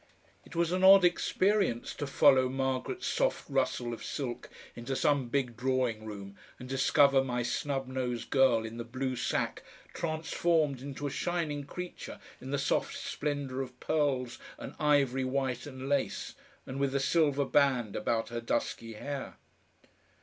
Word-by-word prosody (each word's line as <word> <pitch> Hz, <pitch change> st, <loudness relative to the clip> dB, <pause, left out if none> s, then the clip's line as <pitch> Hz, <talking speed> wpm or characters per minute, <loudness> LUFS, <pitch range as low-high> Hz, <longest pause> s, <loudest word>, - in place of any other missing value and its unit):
It -, -, -14 dB
was 170 Hz, 0 st, +1 dB
an 185 Hz, +1 st, 0 dB
odd 190 Hz, -1 st, +9 dB
experience 185 Hz, -, +1 dB
to 145 Hz, -, -4 dB
follow 130 Hz, -1 st, +5 dB
Margaret's 135 Hz, -, -2 dB
soft -, -, 0 dB
rustle 130 Hz, -3 st, 0 dB
of 115 Hz, -, -7 dB
silk 130 Hz, -5 st, -4 dB, 0.3 s
into 120 Hz, +3 st, -4 dB
some 140 Hz, -3 st, +1 dB
big 125 Hz, -3 st, -1 dB
drawing 125 Hz, -3 st, 0 dB
room 100 Hz, -2 st, -8 dB, 0.2 s
and 125 Hz, -, -9 dB
discover 135 Hz, +1 st, +4 dB
my 125 Hz, -2 st, -1 dB
snub 135 Hz, +2 st, -2 dB
nosed 125 Hz, -2 st, -3 dB
girl 130 Hz, -5 st, +4 dB
in 115 Hz, +1 st, -7 dB
the 120 Hz, -, -4 dB
blue 130 Hz, +2 st, -3 dB
sack -, -, -1 dB, 0.3 s
transformed 160 Hz, -3 st, 0 dB
into 140 Hz, +1 st, -6 dB
a 140 Hz, -, -2 dB
shining 160 Hz, -5 st, -2 dB
creature 180 Hz, +4 st, -7 dB, 0.2 s
in 130 Hz, -, -8 dB
the 140 Hz, -, 0 dB
soft 140 Hz, +1 st, 0 dB
splendour 145 Hz, -3 st, -3 dB
of 125 Hz, -1 st, -8 dB
pearls 135 Hz, -5 st, 0 dB, 0.2 s
and -, -, -8 dB
ivory 140 Hz, -3 st, +3 dB
white 130 Hz, 0 st, -1 dB
and 130 Hz, -1 st, -7 dB
lace, 140 Hz, -1 st, -1 dB, 0.3 s
and 130 Hz, +1 st, -6 dB
with 140 Hz, -1 st, 0 dB
a -, -, +3 dB
silver 145 Hz, -1 st, +2 dB
band 130 Hz, -7 st, +2 dB
about 115 Hz, +1 st, -1 dB
her 120 Hz, 0 st, -4 dB
dusky 115 Hz, 0 st, -2 dB
hair. 140 Hz, +5 st, -5 dB
135 Hz, 155 wpm, -31 LUFS, 125-145 Hz, 0.3 s, odd